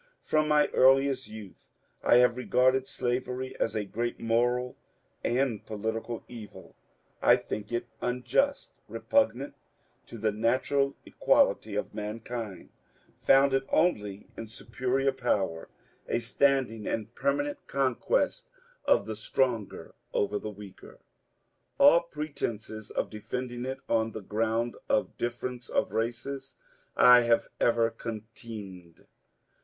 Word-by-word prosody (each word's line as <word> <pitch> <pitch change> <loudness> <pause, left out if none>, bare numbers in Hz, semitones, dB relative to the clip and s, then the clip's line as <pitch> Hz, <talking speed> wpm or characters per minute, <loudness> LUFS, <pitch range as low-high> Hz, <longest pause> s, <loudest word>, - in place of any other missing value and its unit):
From 155 0 +1
my 150 -1 +4
earliest 135 0 +4
youth 105 -3 -11 0.3
I - - +6
have 125 0 +5
re^rded 130 +1 +2
slavery 125 +1 -2
as 115 - 0
a 105 -1 -1
great 120 +4 -3
moral 120 +2 +1 0.5
and 120 -3 0
political 110 +2 -4
evil. 115 -4 -11 0.5
I - - +7
think 105 +1 -5
it 120 0 -1 0.2
unjust, 275 - 0 0.2
repugnant 145 - 0 0.5
to 115 - -9
the 110 0 0
natural 130 +6 +1
equality 105 -2 +2
of 105 - -3
mankind, 110 -1 -6 0.5
founded 135 0 +4
only 105 - +1
in 115 - -7
superior 125 +5 -1
power, 100 -10 -1 0.4
a - - +1
standing 125 -2 +1
and 110 +1 -3
permanent 290 - -1
conquest 135 -3 0 0.4
of - - +3
the 110 - -4
stronger 115 0 -1 0.2
over 105 0 +1
the 110 - -5
weaker. 100 -2 -12 0.8
All 145 +4 +7
pretences 115 -10 -5
of - - -2
defending 120 +3 -5
it 130 +1 -4
on 115 0 +1
the 110 - -7
ground 115 +3 -1
of 135 - +1
difference 120 +1 -4
of - - 0
races 120 +5 -3 0.4
I 125 0 +9
have 120 -1 +2
ever 115 -1 +3
contemned. 105 -6 -9
120 Hz, 115 wpm, -29 LUFS, 110-130 Hz, 0.8 s, I